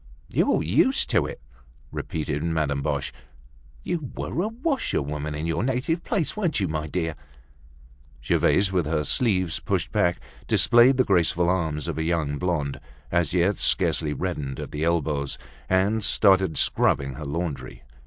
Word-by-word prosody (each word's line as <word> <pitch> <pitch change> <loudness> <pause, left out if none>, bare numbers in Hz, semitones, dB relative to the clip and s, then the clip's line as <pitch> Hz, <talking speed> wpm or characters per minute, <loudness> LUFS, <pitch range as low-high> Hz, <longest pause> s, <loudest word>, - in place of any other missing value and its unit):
"You're - - +2
used 125 - +2
to - - +2
it?" - - -8 0.5
repeated 75 -2 -3
Madame 75 -4 0
Boche. 70 -1 -2 0.7
"You 160 -7 -3
were 170 - -2
a 205 - 0
washerwoman 75 - -2
in 75 +2 -4
your 85 +3 -1
native 135 +7 -1
place, 195 -10 -1
weren't 180 - 0
you, 95 - 0
my 75 -1 -3
dear?" 80 0 -2 1.1
Gervaise, 95 0 +3
with 90 -5 0
her 75 -1 0
sleeves 95 - +1
pushed - - -2
back, 85 0 +1 0.3
displayed 120 +3 +5
the 130 - +4
graceful 90 -3 +2
arms 80 -5 -1
of - - -3
a - - 0
young 80 -4 -1
blonde, 85 -6 -1 0.3
as 85 -1 +1
yet 90 +3 +2
scarcely 75 - +1
reddened 75 -4 -4
at - - -6
the 75 +1 -3
elbows, 75 -4 0 0.3
and 100 +4 +2
started 95 -5 +3
scrubbing 70 -1 +1
her 75 +4 -7
laundry. 75 -1 -4
85 Hz, 150 wpm, -25 LUFS, 75-105 Hz, 1.1 s, displayed